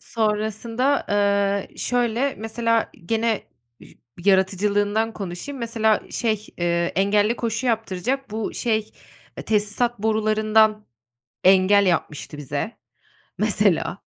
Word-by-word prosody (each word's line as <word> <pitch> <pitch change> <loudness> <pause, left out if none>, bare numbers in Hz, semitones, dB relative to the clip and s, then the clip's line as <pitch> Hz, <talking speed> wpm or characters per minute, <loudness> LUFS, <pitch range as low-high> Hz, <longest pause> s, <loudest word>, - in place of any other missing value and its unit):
Sonrasında, 225 +4 -1
eee, 200 -1 +1
şöyle 245 +2 0
mesela 230 +1 0 0.2
gene 225 0 0 0.4
üş - - -16 0.3
yaratıcılığından 205 +3 +2
konuşayım, 200 +8 -6
mesela 225 -2 +1
şey, 220 -3 -1
eee, 170 0 0
engelli 205 +4 +2
koşu 230 +2 -2
yaptıracak 230 +3 -1
bu 220 0 -4
şey, 220 -3 -1 0.5
eee, - - -6
tesisat 215 +2 0
borularından 215 0 +2 0.6
engel 195 +2 +5
yapmıştı 155 -3 -1
bize 145 - -4 0.6
mesela, - - +1
215 Hz, 100 wpm, -23 LUFS, 200-230 Hz, 0.6 s, engel